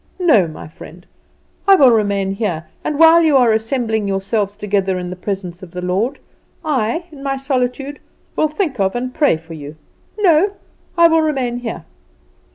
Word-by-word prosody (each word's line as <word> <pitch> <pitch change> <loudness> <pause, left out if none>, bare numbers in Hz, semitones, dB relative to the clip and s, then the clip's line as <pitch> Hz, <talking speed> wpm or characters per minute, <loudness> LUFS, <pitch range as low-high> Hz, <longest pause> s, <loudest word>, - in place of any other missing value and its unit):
No, 290 - +4
my 155 - -9
friend, 170 +2 -13 0.6
I 390 - +8
will 270 -8 +6
remain 200 -3 +1
here; 195 -6 -3 0.2
and, 300 - -2
while 330 +1 +7
you 310 -4 +4
are 240 -4 +4
assembling 220 -1 -1
yourselves 200 +1 -1
together 195 -2 -1
in 180 0 -5
the - - -5
presence 180 -2 -5
of 185 - -10
the 180 +1 -7
Lord, 200 +10 -1 0.5
I, 290 +2 -1
in 285 -3 -12
my 275 -1 -2
solitude, 270 +1 -2 0.4
will 310 - +2
think 305 - -3
of 190 +1 +1
and 250 +1 -3
pray 290 - +2
for 165 +1 -12
you. 150 -1 -9 0.4
No; 390 0 +3 0.4
I 340 0 +7
will 325 -1 +3
remain 265 -6 -1
here!" 235 -2 -6
230 Hz, 170 wpm, -18 LUFS, 195-290 Hz, 0.6 s, I